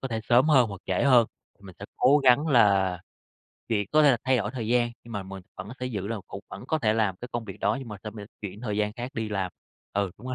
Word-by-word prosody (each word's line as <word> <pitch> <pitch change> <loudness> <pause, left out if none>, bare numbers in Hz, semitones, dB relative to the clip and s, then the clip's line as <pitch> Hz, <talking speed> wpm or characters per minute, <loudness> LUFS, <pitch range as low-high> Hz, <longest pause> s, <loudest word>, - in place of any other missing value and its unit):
có 135 - -4
thể 115 -2 -2
sớm 125 +5 +5
hơn 130 -6 +5
hoặc 100 -3 -8
trễ 95 - 0
hơn. 125 -4 +6 0.3
Mình 95 -2 -12
sẽ 100 - -7
cố 145 +3 +5
gắng 135 +2 +4
là 100 - +3 0.7
việc 105 -3 0
có 155 0 +6
thể 145 - +7
là 125 - +3
thay 130 0 +3
đổi 105 -3 -1
thời 120 -3 -5
gian, 120 0 +2
nhưng 115 - -11
mà 100 -2 -3
mình 95 0 -9
vẫn 95 +2 -7
sẽ 125 - -2
giữ 105 -6 -4
là 115 - -2
cũng 100 - -8
vẫn 100 - -8
có 160 - 0
thể 110 -7 +2
làm 110 -4 +1
cái 125 - -8
công 120 -1 -3
việc 95 -4 -9
đó, 105 - +1
nhưng 130 -3 -8
mà 105 - -6
sẽ 105 - -4
m 110 - -15 0.2
chuyển 105 0 -7
thời 105 -4 -3
gian 105 0 0
khác 120 +3 -6
đi 110 -1 -2
làm. 95 -3 -2 0.4
Ừ, 100 -2 0
đúng 120 - -11
rồi. 130 - -3
110 Hz, 285 wpm, -26 LUFS, 100-125 Hz, 0.7 s, thể